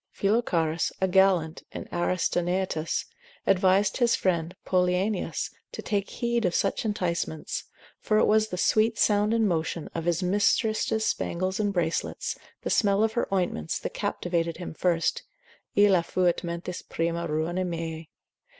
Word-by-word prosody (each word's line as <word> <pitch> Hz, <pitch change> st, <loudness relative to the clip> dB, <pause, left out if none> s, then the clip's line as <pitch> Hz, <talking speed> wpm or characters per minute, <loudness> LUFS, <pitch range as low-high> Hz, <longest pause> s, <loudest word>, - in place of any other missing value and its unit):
Philocharus, 175 Hz, -7 st, 0 dB
a 190 Hz, -, +2 dB
gallant 180 Hz, -4 st, +3 dB
in -, -, -7 dB
Aristenaetus, 175 Hz, -1 st, 0 dB, 0.4 s
advised 190 Hz, +2 st, +3 dB
his 240 Hz, -2 st, +3 dB
friend 175 Hz, -1 st, 0 dB
Poliaenus 185 Hz, +2 st, 0 dB, 0.2 s
to -, -, -6 dB
take 200 Hz, -2 st, -1 dB
heed 235 Hz, -1 st, -1 dB
of 180 Hz, -3 st, +1 dB
such 195 Hz, -, 0 dB
enticements, 170 Hz, -6 st, -2 dB, 0.3 s
for 215 Hz, -, +1 dB
it -, -, +5 dB
was 215 Hz, 0 st, +3 dB
the 180 Hz, -, -5 dB
sweet 220 Hz, +4 st, +2 dB
sound 210 Hz, 0 st, +3 dB
and 225 Hz, -1 st, +3 dB
motion 165 Hz, -2 st, -2 dB
of 165 Hz, -1 st, -4 dB
his 175 Hz, +1 st, +1 dB
mistress's 215 Hz, +3 st, +1 dB
spangles 185 Hz, +3 st, -1 dB
and 205 Hz, -1 st, +1 dB
bracelets, 170 Hz, -4 st, -1 dB, 0.3 s
the -, -, -2 dB
smell 200 Hz, -1 st, +3 dB
of 220 Hz, 0 st, +1 dB
her 235 Hz, -, 0 dB
ointments, 175 Hz, -, -1 dB
that -, -, -5 dB
captivated 170 Hz, -2 st, -1 dB
him 175 Hz, -, -6 dB
first, 170 Hz, 0 st, +1 dB, 0.5 s
Illa 200 Hz, -3 st, +5 dB
fuit 175 Hz, 0 st, 0 dB
mentis 170 Hz, +1 st, -4 dB
prima 170 Hz, +1 st, -2 dB
ruina 160 Hz, +4 st, -1 dB
meae. 165 Hz, -2 st, -4 dB
185 Hz, 140 wpm, -27 LUFS, 170-205 Hz, 0.5 s, it